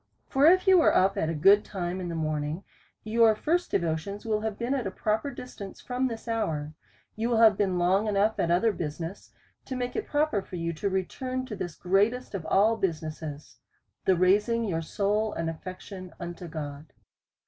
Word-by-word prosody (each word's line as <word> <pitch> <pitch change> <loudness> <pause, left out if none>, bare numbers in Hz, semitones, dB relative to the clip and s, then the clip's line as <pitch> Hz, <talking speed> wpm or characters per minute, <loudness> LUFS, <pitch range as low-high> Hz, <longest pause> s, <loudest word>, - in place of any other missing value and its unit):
For 275 +3 +4
if 370 +4 +5
you 380 -2 +7
was - - +5
up 190 +1 +4
at 160 - 0
a 165 - -2
good 195 +7 +6
time 180 -1 -4
in 175 - -4
the 170 - -4
morning, 155 +2 -2 0.4
your 220 0 +4
first 345 +10 0
devotions 170 +4 -2
will 215 -1 0
have 220 -2 -3
been 240 +3 -1
at 255 -7 -1
a - - -1
proper 215 +7 -1
distance 245 -7 -9
from 255 +1 -1
this 230 -1 -7
hour: 160 -10 -2 0.4
you 225 +2 -1
will 235 - +2
have 220 -2 +7
been 190 -3 0
long 190 +4 +2
enough 210 +1 +1
at 170 - +1
other 185 +6 +3
business, 165 +1 -5 0.4
to 260 - -5
make 245 -1 -3
it 430 - -2
proper 290 -8 +1
for 190 - -9
you 170 -1 -2
to 200 +6 -2
return 255 +7 -2
to 235 -5 -6
this 175 -4 -5
greatest 205 +8 +1
of 175 -5 -4
all 215 +6 +4
business, 155 -5 -4 0.5
the 190 - +4
raising 205 +6 +3
your 170 -7 -1
soul 210 +5 0
and 165 -1 -2
affections 185 +2 -9
unto 175 0 -6
God. 150 -1 -7
195 Hz, 190 wpm, -28 LUFS, 170-225 Hz, 0.5 s, you